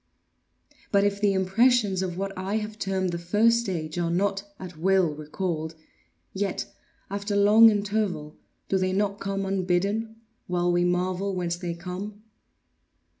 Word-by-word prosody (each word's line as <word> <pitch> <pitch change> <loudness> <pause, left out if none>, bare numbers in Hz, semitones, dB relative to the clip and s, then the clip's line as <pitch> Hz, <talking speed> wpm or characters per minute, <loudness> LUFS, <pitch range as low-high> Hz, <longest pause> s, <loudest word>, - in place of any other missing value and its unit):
But 200 -1 +4
if 200 0 0
the 205 -2 +3
impressions 195 +1 +3
of 180 -2 -3
what 195 0 -3
I 190 +3 -3
have 215 0 -5
termed 190 -2 -1
the 170 - -3
first 215 +7 +3
stage 175 -7 -3
are 170 -1 0
not, 195 +3 0 0.2
at 185 -2 -8
will, 180 0 +2
recalled, 160 +1 -4 0.6
yet, 195 -1 -2 0.5
after 200 +1 -2
long 210 +3 +7
interval, 205 -7 -1 0.3
do 190 - +1
they 185 0 0
not 200 +1 0
come 195 0 -2
unbidden, 195 +4 0 0.3
while 175 0 +1
we 175 0 +2
marvel 185 +2 0
whence 175 -1 -1
they 175 -1 -4
come? 190 +4 -7
190 Hz, 145 wpm, -26 LUFS, 175-205 Hz, 0.6 s, long